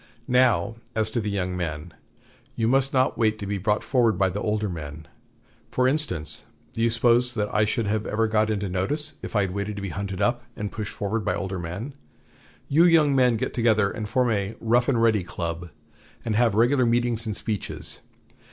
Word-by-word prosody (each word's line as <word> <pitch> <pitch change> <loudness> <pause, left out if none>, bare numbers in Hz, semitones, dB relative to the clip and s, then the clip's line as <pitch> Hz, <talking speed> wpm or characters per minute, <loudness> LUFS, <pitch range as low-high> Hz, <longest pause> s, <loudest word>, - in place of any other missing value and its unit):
Now, 120 -5 +3 0.2
as 110 -1 0
to 115 - -1
the 105 - -2
young 90 -2 -2
men. 80 -2 -4 0.6
You 115 - 0
must 135 +2 +3
not 130 -1 +1
wait 110 -1 +2
to 105 - -6
be 100 0 -2
brought 105 +2 0
forward 120 -7 +2
by 95 0 +3
the 100 +3 -4
older 105 0 0
men. 80 -3 -7 0.6
For 125 0 +2
instance, 130 - -1 0.3
do 115 - -3
you 115 - +3
suppose 120 +1 +3
that 105 -2 -2
I 105 - +3
should 110 +1 -1
ever 105 +1 0
have 110 - -3
got 110 0 +2
into 105 -2 -1
notice 145 - -2
if - - -7
I 105 - +4
had 95 -2 -1
waited 100 +2 -3
to 100 - -6
be 100 - -3
hunted 95 +1 -4
up 120 +4 +1
and 105 -1 -4
pushed 105 -2 -5
forward 105 +2 -2
by 105 - 0
older 95 -1 -3
men? 95 +11 -5 0.7
You 160 +5 +5
young 155 -5 +5
men 125 -3 +4
get - - -3
together 110 -4 +2
and 105 -2 -5
form 125 0 +2
a 100 0 -1
'Rough 120 +2 +2
and 125 -4 +2
Ready 110 -4 +3
Club,' 85 0 -5 0.6
and 110 -2 0
have 115 -2 +3
regular 120 +3 +3
meetings 120 -1 +1
and 105 - -3
speeches.... 105 -4 -4
110 Hz, 205 wpm, -25 LUFS, 100-120 Hz, 0.7 s, You